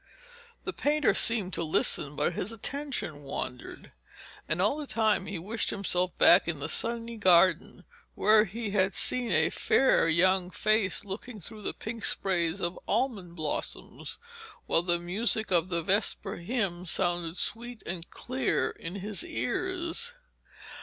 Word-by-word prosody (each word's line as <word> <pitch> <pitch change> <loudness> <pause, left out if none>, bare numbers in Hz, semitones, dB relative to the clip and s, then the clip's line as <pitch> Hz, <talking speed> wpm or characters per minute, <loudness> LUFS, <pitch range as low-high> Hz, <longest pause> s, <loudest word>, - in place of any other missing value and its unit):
The - - -4
painter 300 0 +2
seemed 215 -5 +3
to - - 0
listen, 150 -2 +1
but 150 +4 0
his 190 +5 -3
attention 235 - -4
wandered, 130 -3 -7 0.6
and 160 - 0
all 210 +10 +2
the 300 -2 -6
time 220 -5 +1
he 200 - -4
wished 205 +7 -1
himself 180 -2 0
back 175 +1 +6
in 165 -4 -2
the 145 - -3
sunny 230 +4 0
garden, 185 -2 +3 0.3
where 215 0 +5
he 220 +1 -5
had 195 -1 +1
seen 245 -3 +2
a 160 -1 +3
fair 265 -10 +3
young 180 +2 +3
face 210 +2 0
looking 210 +3 -7
through 215 +5 -9
the - - -2
pink 225 0 -6
sprays 175 -2 0
of 175 +1 -2
almond 210 -7 -1
blossoms, 155 -3 -4 0.5
while 165 - +2
the 175 0 +1
music 205 +5 +1
of 175 0 +2
the 170 -2 -1
vesper 195 +1 0
hymn 180 -2 -2
sounded 175 -1 0
sweet 235 +2 -1
and 170 -1 -5
clear 255 -1 -1
in 165 +3 -8
his 205 - -3
ears. 370 +6 -2
195 Hz, 145 wpm, -29 LUFS, 175-230 Hz, 0.6 s, back